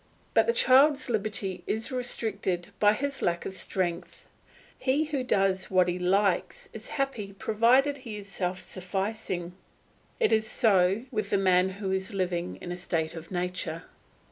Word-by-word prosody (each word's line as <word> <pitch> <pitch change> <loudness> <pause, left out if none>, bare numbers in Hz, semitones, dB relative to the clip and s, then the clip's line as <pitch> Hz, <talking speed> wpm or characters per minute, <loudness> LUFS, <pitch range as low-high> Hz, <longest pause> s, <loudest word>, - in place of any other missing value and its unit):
But - - +4
the - - +5
child's 280 - +4
liberty 200 -4 -1
is 220 +3 -2
restricted 210 -8 -2
by 205 0 +5
his 275 +5 -3
lack 170 0 0
of - - -4
strength. 180 -2 -3 0.5
He 275 +4 +2
who 290 -4 -2
does 195 -5 +1
as 185 -1 +4
he 180 +1 -1
likes 190 +1 +1
is 220 0 -9
happy 240 -8 -2
provided 240 +8 +3
he 230 -6 -7
is 200 -1 -9
self 185 -2 -3
sufficing; 185 -1 -4 0.7
it 470 - +3
is 220 0 +2
so 200 -1 +3
with 215 -4 -2
the 200 - +2
man 185 -1 +3
who 190 0 -4
is 190 +1 -2
living 180 -2 -1
in 175 - -6
a 175 - -4
state 165 -3 -2
of 165 0 -9
nature. 180 -3 -3
195 Hz, 160 wpm, -28 LUFS, 180-225 Hz, 0.7 s, the